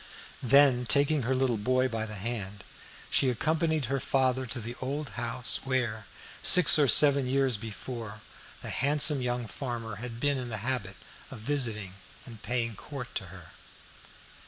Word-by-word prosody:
Then, 130 Hz, -1 st, +4 dB
taking 140 Hz, +6 st, +2 dB
her 130 Hz, +2 st, -1 dB
little 130 Hz, -4 st, 0 dB
boy 130 Hz, +4 st, +1 dB
by 115 Hz, -3 st, -4 dB
the 110 Hz, -, -8 dB
hand, 105 Hz, -1 st, -5 dB, 0.5 s
she 135 Hz, -, +3 dB
accompanied 160 Hz, +3 st, 0 dB
her 135 Hz, +3 st, -2 dB
father 130 Hz, -1 st, 0 dB
to 120 Hz, +2 st, -5 dB
the 120 Hz, +1 st, -6 dB
old 140 Hz, +2 st, -4 dB
house 120 Hz, +2 st, -1 dB
where, 120 Hz, -6 st, -2 dB, 0.3 s
six 180 Hz, -3 st, +6 dB
or 145 Hz, -, +4 dB
seven 140 Hz, +1 st, +6 dB
years 135 Hz, -1 st, +1 dB
before, 110 Hz, 0 st, -8 dB, 0.4 s
the -, -, -4 dB
handsome 145 Hz, +1 st, +3 dB
young 120 Hz, -1 st, -2 dB
farmer 115 Hz, -3 st, -6 dB
had 115 Hz, +1 st, -7 dB
been 140 Hz, 0 st, 0 dB
in 125 Hz, -1 st, -5 dB
the 110 Hz, -, -4 dB
habit 120 Hz, -7 st, -3 dB, 0.3 s
of -, -, -9 dB
visiting 110 Hz, -6 st, -2 dB, 0.3 s
and 115 Hz, -4 st, -12 dB
paying 120 Hz, -1 st, -2 dB
court 125 Hz, +5 st, -9 dB
to -, -, -4 dB
her. -, -, -13 dB
125 Hz, 160 wpm, -28 LUFS, 115-135 Hz, 0.5 s, six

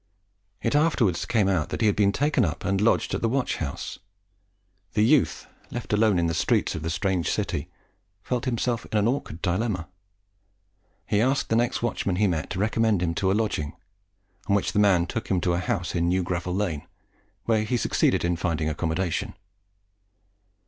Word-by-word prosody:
It -, -, +1 dB
afterwards 145 Hz, -, +2 dB
came 110 Hz, -4 st, +2 dB
out 90 Hz, -6 st, +1 dB
that -, -, -4 dB
he -, -, +3 dB
had 105 Hz, -, +3 dB
been 100 Hz, -1 st, +3 dB
taken 145 Hz, +2 st, +1 dB
up 80 Hz, -6 st, -2 dB
and 95 Hz, +1 st, +1 dB
lodged 110 Hz, -, +2 dB
in -, -, -1 dB
the 115 Hz, -, +1 dB
watch 130 Hz, +2 st, 0 dB
house. 70 Hz, -4 st, -5 dB, 0.9 s
The 105 Hz, 0 st, +3 dB
youth, 140 Hz, +3 st, +2 dB, 0.2 s
left 120 Hz, -3 st, -5 dB
alone 105 Hz, -2 st, +3 dB
in 85 Hz, -, +2 dB
the 85 Hz, -, 0 dB
streets 75 Hz, -, +1 dB
of 80 Hz, -, -5 dB
the 80 Hz, -, -3 dB
strange 90 Hz, 0 st, 0 dB
city, 75 Hz, +4 st, -2 dB, 0.5 s
felt 125 Hz, 0 st, -2 dB
himself 120 Hz, -2 st, -1 dB
in 110 Hz, -, +1 dB
an 105 Hz, +1 st, +3 dB
awkward 120 Hz, -, -3 dB
dilemma. 90 Hz, -2 st, -1 dB, 1.2 s
He 105 Hz, 0 st, +1 dB
asked 130 Hz, +4 st, +1 dB
the 115 Hz, -, +2 dB
next 120 Hz, +1 st, +1 dB
watchman 100 Hz, -5 st, -1 dB
he 105 Hz, +3 st, +2 dB
met 85 Hz, -5 st, -1 dB
to 95 Hz, -, -4 dB
recommend 110 Hz, -2 st, +2 dB
him 85 Hz, -1 st, 0 dB
to 95 Hz, +2 st, +1 dB
a 100 Hz, -, +2 dB
lodging, 95 Hz, -9 st, -1 dB, 0.7 s
on 100 Hz, -, +3 dB
which 100 Hz, -, 0 dB
the -, -, +1 dB
man 95 Hz, -4 st, +4 dB
took 115 Hz, +5 st, -4 dB
him 95 Hz, -, +1 dB
to 90 Hz, -, +1 dB
a 85 Hz, -, 0 dB
house 90 Hz, -1 st, -2 dB
in 85 Hz, -1 st, +1 dB
New 90 Hz, +1 st, +1 dB
Gravel 90 Hz, 0 st, -2 dB
Lane, 90 Hz, -6 st, -2 dB, 0.6 s
where 110 Hz, -2 st, +2 dB
he 120 Hz, +3 st, 0 dB
succeeded 110 Hz, -, +1 dB
in 85 Hz, -1 st, 0 dB
finding 80 Hz, -2 st, -1 dB
accommodation. 80 Hz, +3 st, -2 dB
100 Hz, 190 wpm, -25 LUFS, 85-115 Hz, 1.2 s, man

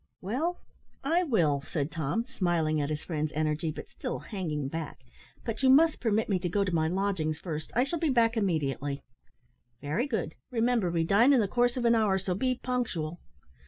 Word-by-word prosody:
"Well, 280 Hz, -, -1 dB, 0.5 s
I 330 Hz, +6 st, +2 dB
will," 170 Hz, -, +2 dB
said 150 Hz, +1 st, -2 dB
Tom, 165 Hz, +8 st, -1 dB
smiling 170 Hz, -, 0 dB
at 145 Hz, -, -2 dB
his 150 Hz, 0 st, -3 dB
friend's 155 Hz, -2 st, -2 dB
energy, 155 Hz, +1 st, 0 dB
but -, -, -8 dB
still 250 Hz, -, -5 dB
hanging 155 Hz, -, -4 dB
back; 160 Hz, +2 st, -5 dB, 0.5 s
"but 225 Hz, +1 st, -3 dB
you 265 Hz, -, +4 dB
must 310 Hz, +4 st, +5 dB
permit 220 Hz, -2 st, +1 dB
me 195 Hz, -3 st, +1 dB
to 175 Hz, 0 st, -2 dB
go 200 Hz, +3 st, +1 dB
to 185 Hz, -2 st, -2 dB
my 160 Hz, -1 st, +2 dB
lodgings 180 Hz, -4 st, 0 dB
first. 155 Hz, -2 st, -5 dB
I 245 Hz, -, +4 dB
shall 320 Hz, +5 st, -2 dB
be 320 Hz, -, +1 dB
back 235 Hz, -3 st, +3 dB
immediately." 145 Hz, -, -1 dB, 0.8 s
"Very 155 Hz, -, -1 dB
good. 215 Hz, -, -2 dB, 0.2 s
Remember, 230 Hz, -5 st, +1 dB
we 170 Hz, -1 st, +1 dB
dine 225 Hz, +11 st, +5 dB
in 265 Hz, -, +5 dB
the 210 Hz, -, +2 dB
course 245 Hz, +4 st, +1 dB
of 245 Hz, -, -1 dB
an 235 Hz, -, +5 dB
hour, 215 Hz, -4 st, +3 dB
so 190 Hz, -1 st, -2 dB
be 255 Hz, +6 st, 0 dB
punctual." 180 Hz, -11 st, -2 dB
195 Hz, 195 wpm, -29 LUFS, 155-240 Hz, 0.8 s, must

